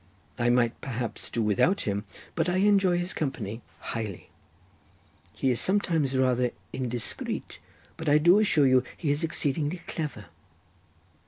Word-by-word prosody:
I 120 0 +2
might 120 -1 +2
perhaps 120 -3 -4
do 115 - -1
without 110 - +2
him, 100 0 -2 0.3
but - - 0
I 180 - 0
enjoy 195 -2 +4
his 175 +1 -1
company 120 -7 -3 0.3
highly. 110 -5 -5 1.0
He 135 - +1
is 120 - +1
sometimes 165 -9 +1
rather 125 -1 +2 0.2
indiscreet, 125 -3 -3 0.4
but 160 -2 -2
I 145 - +6
do 175 +6 +6
assure 160 -9 +3
you 130 -1 +5
he 150 -4 0
is 145 +3 0
exceedingly 155 +1 -1
clever." 145 -10 -5
135 Hz, 140 wpm, -27 LUFS, 120-170 Hz, 1.0 s, I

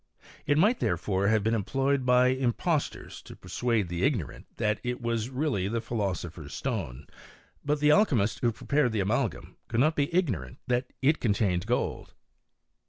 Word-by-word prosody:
It 145 +1 +3
might 210 +9 +4
therefore 95 +3 0
have 110 -1 +2
been 110 +2 +1
employed 135 +5 0
by 125 0 +5
impostors 130 +5 -1
to - - -12
persuade 110 +2 -1
the 85 0 -4
ignorant 115 - -1
that 105 -2 0
it 125 0 -2
was 115 -1 -2
really 130 -8 -1
the 115 +3 -1
philoso 100 -7 -3
pher's 80 -4 -9
stone; 80 - -4 0.6
but 145 +1 0
the 150 0 +4
alchymists 130 - +3
who 120 - +2
prepared 135 +1 0
the 110 - 0
amalgam 100 +5 -1
could 115 - -1
not 155 +5 +3
be 145 0 0
ignorant 120 - -1
that 125 +1 -1
it 150 +4 +3
contained 100 -4 +1
gold. 125 - -2
120 Hz, 165 wpm, -28 LUFS, 100-135 Hz, 0.6 s, by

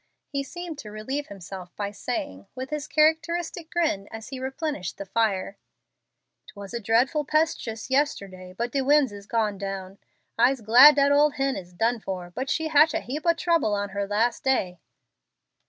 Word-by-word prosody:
He 280 -1 -2
seemed 335 +2 -7
to 215 - -8
relieve 260 +8 -4
himself 185 -2 -9
by 205 -1 -3
saying, 100 - -5
with 260 +2 -6
his 300 0 -3
characteristic 320 +2 +1
grin, 305 -13 0
as 225 0 -9
he 265 -1 -6
replenished 265 - -4
the 200 - -6
fire, 200 -1 -1 0.9
"It - - -15
was 200 +1 -9
dreadful 250 +8 +2
'pestuous 295 -7 -1
yesterday, 200 -10 -1
but 235 +1 -2
de 275 - 0
winds 285 -1 +4
is 200 0 -11
gone 215 -4 0
down. 195 -1 -6 0.4
I'se 260 +1 +4
glad 250 +7 +8
dat 280 0 +4
ole 295 +1 +5
hen 270 -1 0
is 180 -2 -8
done 225 +6 0
for, 185 -4 -6
but 260 +9 -4
she 320 +1 0
hatch 305 +1 +5
a - - +1
heap 295 +6 -5
ob 335 -1 +4
trouble 330 -12 +1
on 205 0 -2
her 200 0 -3
las' 225 +4 +1
day." 185 -10 0
245 Hz, 175 wpm, -25 LUFS, 200-295 Hz, 0.9 s, glad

